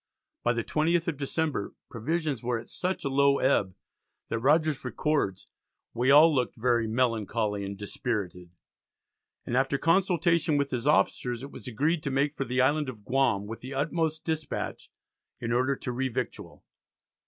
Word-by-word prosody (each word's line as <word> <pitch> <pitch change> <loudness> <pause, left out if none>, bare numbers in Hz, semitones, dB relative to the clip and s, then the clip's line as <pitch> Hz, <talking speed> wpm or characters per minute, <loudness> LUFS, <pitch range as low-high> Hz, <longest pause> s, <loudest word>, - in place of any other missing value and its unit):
By 120 - +2
the 115 -1 -1
20th 165 +5 +1
of 165 -4 -1
December 145 -4 -2
provisions 145 +2 -2
were 120 0 -1
at 115 - -9
such 185 -3 -2
a - - +2
low 140 +1 +3
ebb 100 -8 +1 0.5
that 115 - -1
Rogers 150 +3 +2
records 125 -7 -1 0.5
"we 120 +3 +1
all 155 +3 +8
looked 125 -3 0
very 120 -1 +1
melancholy 110 -3 0
and 100 0 -5
dispirited," 100 -4 -4 1.0
and 120 - -2
after 135 +1 +2
consultation 170 -2 +2
with 140 -1 0
his 125 +2 -2
officers 125 -4 +1
it 140 - -8
was - - -10
agreed 150 +8 0
to 140 - -3
make 140 +2 0
for 135 - -2
the 125 +1 +1
Island 145 +2 +2
of 110 -5 -10
Guam 130 -6 +1
"with 115 +2 -7
the 130 +2 -7
utmost 160 +2 -1
dispatch" 160 -2 -4 0.5
in 115 0 -2
order 130 +3 +2
to 130 - -5
revictual. 130 -1 -4
135 Hz, 160 wpm, -28 LUFS, 115-150 Hz, 1.0 s, all